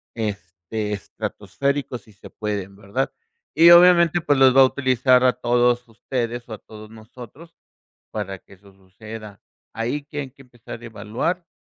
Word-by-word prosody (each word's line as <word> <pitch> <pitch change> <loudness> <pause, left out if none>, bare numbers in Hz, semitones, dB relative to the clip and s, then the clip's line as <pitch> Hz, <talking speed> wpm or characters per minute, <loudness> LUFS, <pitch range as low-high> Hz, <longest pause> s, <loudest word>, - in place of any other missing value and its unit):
este, 105 -1 -4
estratosféricos 140 +5 -4
si 110 - -20
se 100 - -14
pueden, 100 -2 -5
¿verdad? 105 +6 -3 0.4
Y 165 +1 +7
obviamente, 175 -1 +7
pues 145 -4 +2
los 130 -1 +6
va 135 - +8
a - - +9
utilizar 130 -1 +2
a 125 - +4
todos 120 0 +1
ustedes 120 +1 -4
o - - -6
a - - -6
todos 110 -1 -13
nosotros 125 +9 -14 0.6
para 100 -3 -5
que 100 - -19
eso 100 +1 -20
suceda. 105 +2 -12 0.3
Ahí 125 +6 -2
que 145 0 -6
hay 135 -2 -7
que 135 +1 -18
empezar 120 -2 -11
a - - -11
evaluar, 115 - -3
120 Hz, 160 wpm, -22 LUFS, 105-135 Hz, 0.6 s, a